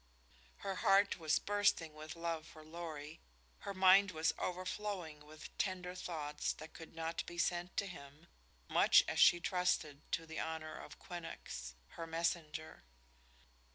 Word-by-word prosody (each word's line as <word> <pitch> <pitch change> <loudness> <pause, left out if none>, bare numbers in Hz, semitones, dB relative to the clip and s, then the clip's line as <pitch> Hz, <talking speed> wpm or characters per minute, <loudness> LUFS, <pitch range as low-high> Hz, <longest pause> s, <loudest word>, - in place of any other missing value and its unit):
Her 195 -2 -1
heart 195 -1 +4
was 160 -1 +3
bursting 205 -6 +2
with 155 +1 -8
love 165 -1 -3
for 155 - -13
Lorry; 155 -2 -7 0.4
her 200 - -5
mind 190 +2 +7
was 160 -2 +1
overflowing 180 -4 -3
with 155 +1 -11
tender 180 -2 -1
thoughts 155 -5 -3
that 155 0 -11
could 165 -1 -11
not 165 0 -2
be 175 - -7
sent 175 +1 0
to 200 - +2
him, 155 -4 -10 0.4
much - - +6
as - - -1
she 175 - +8
trusted 175 -5 0
to 165 - 0
the 160 0 -6
honor 160 -1 -3
of - - -9
Quinnox, 65 - -7
her 165 - -7
messenger. 160 - -2
165 Hz, 145 wpm, -37 LUFS, 155-180 Hz, 0.4 s, she